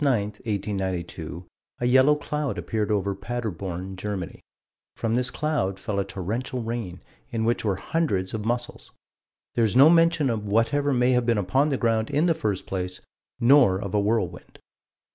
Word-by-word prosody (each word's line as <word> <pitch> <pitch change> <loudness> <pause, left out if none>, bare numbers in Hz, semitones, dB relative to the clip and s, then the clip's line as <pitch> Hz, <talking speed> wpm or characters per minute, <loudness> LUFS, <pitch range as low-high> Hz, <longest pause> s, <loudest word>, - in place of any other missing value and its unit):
9, 140 -2 +4
1892, 95 -5 -4 0.3
a 120 - -1
yellow 130 +4 +5
cloud 150 -1 -3
appeared 110 -3 -2
over 100 -2 0
Paderborn, 95 -4 -5
Germany. 95 -2 -5 0.5
From 115 -1 -1
this 125 +1 +1
cloud, 145 -12 -1
fell 100 +1 -2
a - - +1
torrential 110 +7 -4
rain, 110 -6 -5 0.3
in 110 -1 -1
which 120 +1 +1
were 100 -3 +1
hundreds 95 - -1
of 110 -2 -3
mussels. 120 +2 -3 0.6
There 115 - +2
is 110 0 +1
no 140 +5 +8
mention 165 -5 +4
of 110 -2 -2
whatever 115 +8 +1
may 125 -1 +3
have 125 -1 +2
been 115 -2 +3
upon 130 +10 +2
the 135 - 0
ground 115 -2 +1
in 145 +3 +2
the 170 - +4
first 105 - -2
place, 90 -1 -4 0.4
nor 120 -6 +5
of 100 -2 -5
a 105 - +3
whirlwind. 100 -4 -2
110 Hz, 165 wpm, -25 LUFS, 95-130 Hz, 0.6 s, no